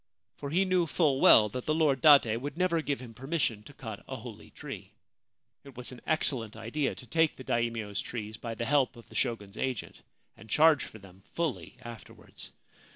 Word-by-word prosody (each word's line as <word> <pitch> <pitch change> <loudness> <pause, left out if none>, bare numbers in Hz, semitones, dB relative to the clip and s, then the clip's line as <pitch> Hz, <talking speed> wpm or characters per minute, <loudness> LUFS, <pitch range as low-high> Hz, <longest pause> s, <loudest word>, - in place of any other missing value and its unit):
For 140 - -6
he 180 +6 +2
knew 185 -2 +2
full 145 -4 +2
well 105 - +8
that 125 +4 -5
the 155 - +1
Lord 145 -5 +2
Date 140 -7 +7
would 145 +6 -6
never 175 -2 +2
give 145 -3 -2
him 120 -2 -10
permission 130 -4 -1
to 110 - -13
cut 110 -7 -8
a - - -5
holy - - -10
tree. - - -9 0.7
It 140 -3 -14
was 125 +1 -6
an 125 - -11
excellent 125 -8 0
idea 115 +6 -2
to 125 - -11
take 160 +4 +2
the 130 - -10
Daimio's 115 -4 -1
trees 110 -2 -6
by 115 0 -6
the 115 - -3
help 135 0 +2
of 115 - -14
the - - -14
Shogun's 110 -5 -2
agent, 130 -6 -3 0.3
and 110 - -15
charge 155 +3 +5
for - - -11
them 95 -2 -16
fully 160 -6 -2
afterwards. 120 -2 -11
130 Hz, 195 wpm, -30 LUFS, 115-150 Hz, 0.7 s, well